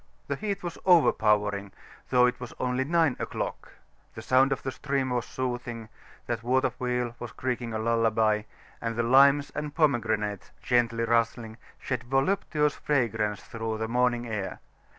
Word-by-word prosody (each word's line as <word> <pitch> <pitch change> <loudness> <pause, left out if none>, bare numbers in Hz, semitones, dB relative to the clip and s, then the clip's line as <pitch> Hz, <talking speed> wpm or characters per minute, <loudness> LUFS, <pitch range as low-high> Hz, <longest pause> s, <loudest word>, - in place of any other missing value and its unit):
The - - -2
heat 200 -3 -4
was 175 -1 -5
overpowering, 105 - +3 0.4
though 125 -1 +5
it 125 - 0
was 125 -2 -8
only 125 +1 0
nine 160 -1 +2
o'clock, - - -5 0.4
the 110 - -8
sound 130 +3 +4
of 135 - -2
the 130 - -2
stream 135 -1 -2
was 120 -1 -1
soothing, 120 -3 -4 0.4
that 115 -2 -3
water 130 +2 +1
wheel 125 -1 -1
was 120 - -6
creaking 125 -2 -3
a 110 - -2
lullaby, 110 -1 +2 0.4
and 115 0 -2
the 120 - 0
limes 140 +4 +5
and 150 -1 -5
pomegranates, 110 - 0
gently 115 -2 +2
rustling, 115 -1 0 0.2
shed 125 -2 -4
voluptuous 150 +2 +1
fragrance 110 -7 -1
through 110 -1 -4
the 110 0 -2
morning 120 0 +1
air. 105 -4 -4
120 Hz, 150 wpm, -27 LUFS, 115-130 Hz, 0.4 s, though